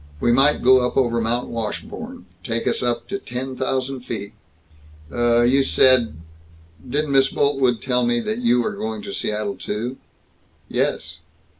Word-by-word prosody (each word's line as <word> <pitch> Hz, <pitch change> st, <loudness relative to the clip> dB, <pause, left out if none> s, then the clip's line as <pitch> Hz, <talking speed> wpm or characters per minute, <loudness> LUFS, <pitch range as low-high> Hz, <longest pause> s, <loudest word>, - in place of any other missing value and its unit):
"We 120 Hz, -, +2 dB
might 135 Hz, +4 st, +3 dB
go 130 Hz, +1 st, +7 dB
up 125 Hz, -, -2 dB
over 120 Hz, -3 st, +2 dB
Mount 120 Hz, +2 st, -1 dB
Washburn. 230 Hz, -, -6 dB, 0.2 s
Take 115 Hz, -3 st, -2 dB
us -, -, +1 dB
up 120 Hz, -1 st, -1 dB
to 200 Hz, 0 st, -3 dB
ten 130 Hz, +2 st, -5 dB
thousand 130 Hz, 0 st, -2 dB
feet." 110 Hz, -4 st, -6 dB, 0.8 s
"Uh, 120 Hz, 0 st, +3 dB
you 130 Hz, +3 st, +4 dB
said 130 Hz, -, +4 dB, 0.7 s
didn't 145 Hz, +2 st, -1 dB
Miss 135 Hz, -1 st, +5 dB
Boltwood 135 Hz, -5 st, +1 dB
tell 125 Hz, -1 st, +1 dB
me 120 Hz, 0 st, +1 dB
that 215 Hz, -, -3 dB
you 125 Hz, -, +2 dB
are -, -, -2 dB
going 110 Hz, -1 st, -5 dB
to 100 Hz, -, -6 dB
Seattle, 105 Hz, -1 st, -2 dB
too?" 120 Hz, +5 st, -4 dB, 0.7 s
"Yes." -, -, -2 dB
125 Hz, 155 wpm, -22 LUFS, 115-135 Hz, 0.8 s, go